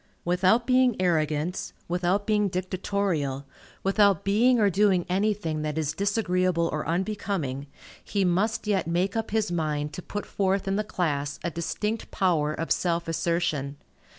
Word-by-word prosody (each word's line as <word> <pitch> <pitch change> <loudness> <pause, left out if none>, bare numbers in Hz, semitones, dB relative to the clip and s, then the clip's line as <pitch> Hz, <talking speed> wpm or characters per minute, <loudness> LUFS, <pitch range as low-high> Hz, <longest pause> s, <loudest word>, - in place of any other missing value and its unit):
Without 185 +7 +3
being 255 -3 +3
arrogant, 160 -1 0
without 180 +3 0
being 210 -1 +2
dictatorial, 180 -6 -2 0.4
without 195 -2 +3
being 230 +5 +3
or 210 - +4
doing 190 -2 +3
anything 190 -4 0
that 150 0 -3
is 155 -1 -1
disagreeable 185 -4 +1
or 155 - -3
unbecoming, 170 -7 -2 0.4
he 200 -2 0
must 195 +6 +1
yet 200 -5 0
make 180 +4 0
up 225 -1 -2
his 215 -2 0
mind 150 -3 -1
to 180 - -6
put 205 +3 -5
forth 195 0 0
in 195 - +1
the 210 - 0
class 145 -8 -2
a 170 - -1
distinct 210 +6 -3
power 160 -6 +1
of 165 +2 -4
self 170 -1 +1
assertion. 160 -4 -1
180 Hz, 150 wpm, -26 LUFS, 160-205 Hz, 0.4 s, or